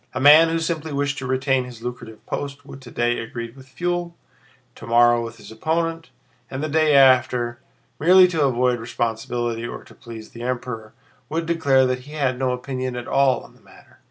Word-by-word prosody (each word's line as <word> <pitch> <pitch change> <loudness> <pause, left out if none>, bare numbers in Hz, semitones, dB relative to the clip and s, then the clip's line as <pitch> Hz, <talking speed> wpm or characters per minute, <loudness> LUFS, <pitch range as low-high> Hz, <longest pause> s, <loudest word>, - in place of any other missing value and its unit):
A - - -1
man 150 +4 +7
who 165 - 0
simply 160 -1 -3
wished 140 0 -1
to 130 - -5
retain 130 0 +1
his 120 -2 -11
lucrative 120 -3 -8
post 140 0 -5
would 135 -1 -11
today 120 -1 -1
agree 115 0 -6
with 130 +1 -16
Pfuel, 175 +5 -3 0.6
tomorrow 120 0 +3
with 115 0 -8
his 110 - -13
opponent, 165 +7 -2 0.4
and 135 +2 -5
the 155 - -2
day 155 -1 +3
after, 125 -3 +4 0.4
merely 180 +4 +7
to 160 -4 0
avoid 125 -1 +1
responsibility 115 0 -3
or - - -8
to - - -17
please 115 -4 -11
the 115 - -10
Emperor, 120 -3 -5 0.3
would 165 +1 -2
declare 140 -6 +3
that 130 0 -1
he 145 +4 -13
had 130 -4 -1
no 130 -1 +1
opinion 130 0 -4
at 120 0 -6
all 135 -3 +2
on - - -16
the - - -24
matter. - - -20
130 Hz, 185 wpm, -22 LUFS, 120-150 Hz, 0.6 s, man